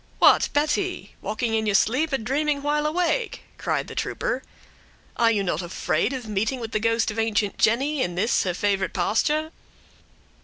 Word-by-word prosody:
"What, - - +5
Betty! 300 - -1
Walking 225 +3 -2
in 220 -1 +1
your 205 - +2
sleep, 275 +10 +2
or 270 - +2
dreaming 280 +5 -1
while 300 +1 +1
awake?" 360 +9 -1 0.2
cried - - -1
the - - -8
trooper. - - -2 0.7
"Are 230 -1 +4
you 210 -3 +1
not 175 -3 -1
afraid 180 +6 -1
of 255 -4 -5
meeting 215 +5 -1
with 225 -2 -6
the 215 - 0
ghost 230 0 +1
of 220 - -5
ancient 215 -2 0
Jenny 270 +6 +2
in 175 -7 -1
this 220 +6 +2
her 180 -2 -1
favorite 195 -1 0
pasture?" 300 - +1
230 Hz, 175 wpm, -24 LUFS, 210-295 Hz, 0.7 s, What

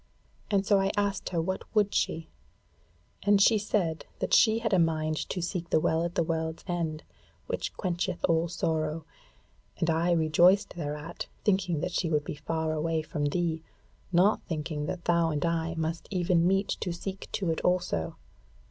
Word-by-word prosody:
And 200 -2 +2
so 200 -1 +4
I 195 0 +2
asked 200 -1 0
her 175 - -1
what 185 +3 -1
would 205 -1 +3
she, 160 0 0 0.9
and 205 0 +4
she 215 +2 +5
said 180 -6 -1
that - - -2
she 220 -1 +6
had 225 -2 -1
a 185 - +5
mind 155 -1 +1
to 180 - -2
seek 175 -1 -3
to - - -29
the - - +4
Well 160 +1 +1
at 170 0 -3
the - - +2
World's 160 0 -2
End, 165 -3 -2 0.4
which - - -4
quencheth 180 -1 -1
all 165 0 +2
sorrow; 160 -2 -1 0.7
and 165 - +1
I 165 +2 +2
rejoiced 175 +5 +4
thereat, 150 0 -5 0.2
thinking 185 -6 +1
that 180 +1 -2
she 170 -1 0
would 150 -2 +1
be - - -5
far 160 +2 -2
away 160 +1 -1
from 150 -1 -3
thee, 160 +1 0 0.5
not 185 +4 +4
thinking 155 -2 -3
that 175 - -5
thou 170 -1 +3
and 150 0 -1
I 165 0 -1
must 160 +1 -3
even 175 -2 +2
meet 195 +1 +2
to 180 - -2
seek 190 +3 -6
to 185 -5 0
it 160 - -2
also. 180 - 0
170 Hz, 180 wpm, -29 LUFS, 160-185 Hz, 0.9 s, she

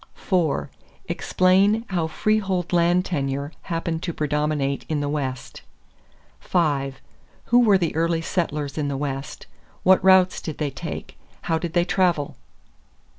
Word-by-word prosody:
4. 170 -7 0 0.4
Explain 195 +5 +2
how 175 -4 0
freehold 190 -1 0
land 175 +1 +3
tenure 140 -3 -2 0.2
happened 165 -1 -2
to 175 - -3
predominate 150 -2 -1
in 155 -2 0
the 145 - -1
West. 135 -3 -4 0.8
5. 140 -6 0 0.5
Who 240 - +4
were 215 -5 +5
the 170 -4 -2
early 165 0 +1
settlers 150 -5 -2
in 145 - -1
the 140 -1 -2
West? 135 -1 -5 0.4
What 190 0 +5
routes 185 -1 +5
did 155 - -6
they 150 -2 -2
take? - - -7 0.2
How 165 -1 0
did 170 0 -4
they 175 -1 +3
travel? 175 -5 +1
165 Hz, 135 wpm, -23 LUFS, 145-185 Hz, 0.8 s, were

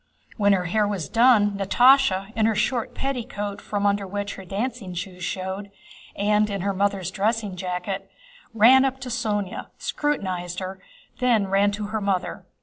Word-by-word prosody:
When 205 -2 +3
her 180 -2 0
hair 210 +4 +1
was 195 -6 -3
done, 230 -3 +4
Natásha, 220 -1 +4
in 220 -1 +3
her 225 - +1
short 245 +2 -1
petticoat 240 -6 -4
from 205 -1 -2
under 200 -1 +1
which 205 +1 -4
her 195 - -10
dancing 200 -1 -4
shoes 180 0 -6
showed, 190 +2 -4 0.5
and 210 +1 +2
in 200 -2 -3
her 200 +1 0
mother's 195 -2 0
dressing 210 0 -1
jacket, 180 +2 -4 0.4
ran 240 +4 +6
up 265 -1 -1
to 255 - -5
Sónya, 210 -5 -2
scrutinized 185 - -2
her, 190 0 -6 0.3
and - - -33
then 235 -5 +2
ran 200 +1 +3
to 205 0 -4
her 220 - -1
mother. 195 -2 -2
205 Hz, 165 wpm, -24 LUFS, 190-225 Hz, 0.5 s, ran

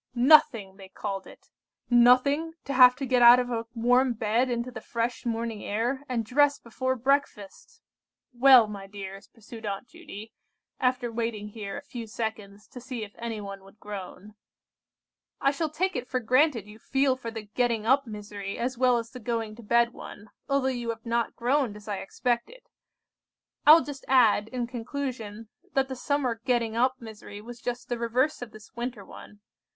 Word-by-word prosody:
"Nothing! 240 -7 +4
they 190 -1 -12
called 195 0 -5
it - - -17 0.4
nothing 255 +6 +4
to 280 - -3
have 250 -1 +8
to 270 +1 -4
get 250 -1 +2
out 240 +1 +10
of 245 0 -2
a 230 -1 -3
warm 245 +2 +3
bed 225 +3 0
into 240 +1 -2
the 225 -3 -8
fresh 235 +2 -3
morning 230 -2 -3
air, 240 +7 -2
and 235 -3 -1
dress 285 +5 +3
before 260 +3 -3
breakfast! 255 -6 -2 0.5
"Well, 250 -1 +7
my 200 -2 -8
dears," 195 0 -9
pursued 225 0 -13
Aunt 200 +2 -4
Judy, 225 -10 -11 0.5
after 250 -2 0
waiting 225 -2 -3
here 205 -2 -6
a - - -8
few 240 -5 -8
seconds, 215 -2 -6
to 250 - -10
see 250 -2 -5
if 205 -1 -10
anybody 210 -4 -6
would 195 +2 -19
groan, 205 0 -8 1.1
"I 275 - +3
shall 310 +2 -2
take 365 +4 -1
it 250 0 -4
for 255 - 0
granted 255 -1 +2
you 210 +1 -14
feel 270 +2 +1
for 245 -3 -7
the 225 -1 -7
getting 225 +1 -1
up 265 +2 +3
misery 205 -2 -7
as 245 +1 -3
well 250 -1 +4
as 230 0 -5
the 255 - -9
going 225 -2 -3
to - - -10
bed 235 +2 +2
one, 205 0 -11 0.2
although 275 -1 +2
you 240 -2 -3
have 225 -1 -5
not 235 0 -1
groaned 250 -2 0
as 210 0 -13
I 205 -2 -2
expected. 245 - -3 1.1
I 305 - +12
will 325 - +6
just 280 -2 -8
add, 225 -5 +4
in 245 0 -3
conclusion, 235 -3 -6 0.2
that 270 0 +1
the 260 - -4
summer 250 -3 -1
getting 235 -3 0
up 255 +2 +1
misery 220 -2 -10
was 240 +3 -11
just 245 0 -4
the 240 -1 -3
reverse 250 +6 0
of 245 - -6
this 215 -1 -15
winter 235 -4 -5
one. 205 -1 -13
235 Hz, 180 wpm, -27 LUFS, 215-255 Hz, 1.1 s, I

